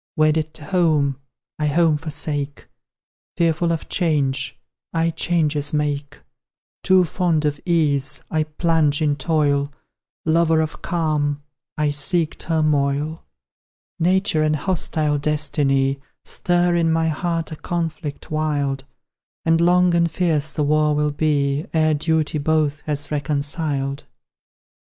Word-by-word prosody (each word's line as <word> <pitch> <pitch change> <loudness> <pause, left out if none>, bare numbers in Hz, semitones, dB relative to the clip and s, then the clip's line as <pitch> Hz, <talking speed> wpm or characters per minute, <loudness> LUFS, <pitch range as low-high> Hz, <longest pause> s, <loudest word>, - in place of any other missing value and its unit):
Wedded 155 0 +1
to 150 - -11
home 150 -6 +1 0.4
I 150 - +1
home 160 +1 +3
forsake; 145 -2 -3 0.7
Fearful 170 0 +1
of 165 - -3
change 140 -6 0 0.3
I 165 0 +1
changes 155 -4 0
make; 145 -1 -2 0.6
Too 185 -1 +4
fond 165 -3 0
of 145 -1 -1
ease 145 -5 +1
I 155 -1 +1
plunge 155 -2 +1
in 150 -2 +1
toil; 145 -2 +1 0.5
Lover 165 0 +3
of 160 0 -3
calm 150 -4 -1 0.3
I 150 -1 +1
seek 155 +3 +1
turmoil: 150 -1 0 0.8
Nature 180 -1 +2
and 155 0 +2
hostile 155 -3 0
Destiny 140 -2 +1 0.2
Stir 175 0 +1
in 165 -1 +2
my 165 0 +1
heart 165 +1 -2
a - - -4
conflict 165 -3 -4
wild; 145 -3 -1 0.6
And 165 0 +3
long 180 +1 +4
and 170 0 +3
fierce 155 -3 0
the 150 - -1
war 150 0 +2
will 150 0 +1
be 145 -1 0
Ere 155 -1 +3
duty 155 0 0
both 150 -1 +1
has 145 -1 -2
reconciled. 145 -1 -1
155 Hz, 120 wpm, -21 LUFS, 145-165 Hz, 0.8 s, Too